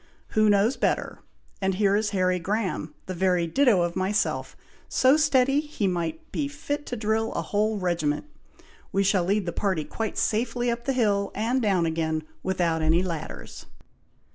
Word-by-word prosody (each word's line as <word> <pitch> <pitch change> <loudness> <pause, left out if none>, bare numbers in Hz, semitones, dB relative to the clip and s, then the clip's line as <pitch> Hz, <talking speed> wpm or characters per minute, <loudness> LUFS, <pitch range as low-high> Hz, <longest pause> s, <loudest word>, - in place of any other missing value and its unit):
"Who 215 -1 +3
knows 205 +5 +3
better! - - -1 0.4
and 190 -1 +1
here 200 0 +3
is 210 0 +1
Harry 185 -2 +1
Graham, 185 -5 -2
the 185 - -4
very 180 -1 +1
ditto 210 - +3
of 175 0 -2
myself, 200 +3 -1 0.3
so 260 +2 +4
steady 275 -2 +3
he 295 -8 -3
might 180 - -2
be 285 - -1
fit 290 0 -4
to 245 - -3
drill 220 0 0
a - - -2
whole 215 +1 0
regiment. 170 - -1 0.7
We 195 - +2
shall 190 -2 +2
lead 200 +1 +1
the 170 - -3
party 190 -6 0
quite 225 -1 -4
safely 240 +2 0
up 235 0 -4
the 270 - +1
hill, 205 -5 +1
and 235 +5 0
down 195 -6 +2
again, 160 -1 -1 0.2
without 175 -3 0
any 160 +3 +3
ladders." 170 -4 -6
200 Hz, 165 wpm, -26 LUFS, 180-235 Hz, 0.7 s, so